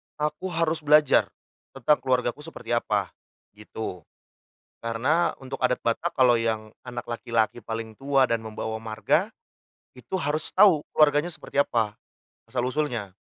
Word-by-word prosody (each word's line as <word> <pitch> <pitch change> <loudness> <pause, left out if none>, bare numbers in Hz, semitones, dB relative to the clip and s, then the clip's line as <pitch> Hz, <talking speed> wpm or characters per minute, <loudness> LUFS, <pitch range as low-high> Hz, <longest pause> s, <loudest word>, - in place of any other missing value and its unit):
aku 150 +4 -2
harus 165 -2 0
belajar 150 -1 +5 0.5
tentang 150 - +3
keluargaku 125 +1 0
seperti 165 -3 -8
apa, 120 0 0 0.4
gitu. 105 -2 -7 0.9
Karena 130 +10 +1
untuk 135 +1 -6
adat 125 0 0
Batak, 120 +9 -1
kalau 125 -3 +5
yang 110 -1 -1 0.2
anak 120 -1 -6
laki-laki 115 -1 0
paling 115 -1 -6
tua 135 -1 +2
dan 115 - +2
membawa 110 0 -4
marga, 110 -1 0 0.6
itu 125 +9 -6
harus 150 0 -1
tahu 185 -6 +6
keluarganya 150 +2 +3
seperti - - -10
apa 115 -6 -1 0.5
asal-usulnya. 125 -6 -2
125 Hz, 125 wpm, -26 LUFS, 115-150 Hz, 0.9 s, tahu